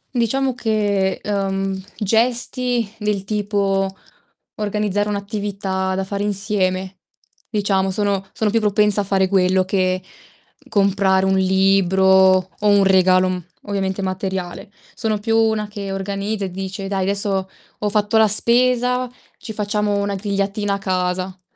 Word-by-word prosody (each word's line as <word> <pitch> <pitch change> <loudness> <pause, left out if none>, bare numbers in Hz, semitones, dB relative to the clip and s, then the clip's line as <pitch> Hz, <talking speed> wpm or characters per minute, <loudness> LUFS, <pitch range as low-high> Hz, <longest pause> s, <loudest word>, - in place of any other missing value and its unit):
Diciamo 260 +3 +1
che, 205 -5 0
uhm, 195 -1 -1 0.2
gesti 240 +2 0
del 210 -2 -1
tipo 195 -2 -1 0.6
organizzare 210 -1 -1
un'attività 200 -2 -3
da 195 - -1
fare 200 +1 -4
insieme, 190 -2 -1 0.5
diciamo, 195 -3 0
sono 200 0 0
sono 215 -2 -1
più 230 - +2
propensa 210 -1 +4
a - - -2
fare 190 -1 +2
quello 185 -1 +2
che 185 -1 0 0.7
comprare 195 -2 +2
un 190 0 +2
libro, 190 0 +3 0.5
o 210 - 0
un 205 -1 +5
regalo, 185 -1 +4
mhmm, 180 -2 -4 0.2
ovviamente 195 -1 -2
materiale. 190 -1 -4 0.2
Sono 215 -1 -1
più 225 +2 -1
una 220 -1 +1
che 205 -1 -6
organizza 200 +2 -3
e 185 - -6
dice: 195 +1 -5
"Dai, 195 -1 -1
adesso 195 -1 -1 0.3
ho 210 - -1
fatto 205 +1 0
la 220 0 +6
spesa, 250 +3 +2 0.3
ci 225 - -7
facciamo 210 0 -1
una 200 0 -1
grigliatina 200 +1 -1
a - - -3
casa." 185 -1 -2
200 Hz, 135 wpm, -20 LUFS, 190-210 Hz, 0.7 s, la